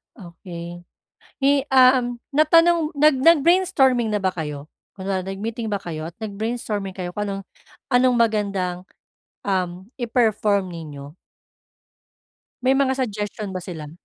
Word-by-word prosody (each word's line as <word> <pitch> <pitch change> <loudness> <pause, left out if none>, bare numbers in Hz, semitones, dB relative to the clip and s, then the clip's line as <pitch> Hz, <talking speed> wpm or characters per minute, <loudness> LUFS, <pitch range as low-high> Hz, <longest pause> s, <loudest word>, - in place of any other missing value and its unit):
Okey. 175 -3 -9 0.6
Eh, 280 0 +4
um, 255 -2 +4 0.2
natanong 330 +2 +4
nag 300 0 +5
nag-brainstorming 310 -6 +4
na 210 - 0
ba 185 -1 +1
kayo? 150 -4 -6 0.3
Kunwari, 190 -1 -3
nag-meeting 220 +4 -4
ba 205 - 0
kayo? 160 -2 -6
At 170 - -13
nag-brainstorming 210 -2 -4
kayo 180 -2 -5
kung 210 - -3
anong 195 0 -4 0.5
anong 250 0 +4
magandang, 200 -6 0 0.6
um, 185 0 -2
i-perform 215 -5 +1
ninyo? 150 -4 -9 1.5
May 265 +1 +3
mga 270 -1 +2
suggestion 210 -5 -3
ba 190 - -4
sila? 160 -5 -8
210 Hz, 120 wpm, -22 LUFS, 180-255 Hz, 1.5 s, nag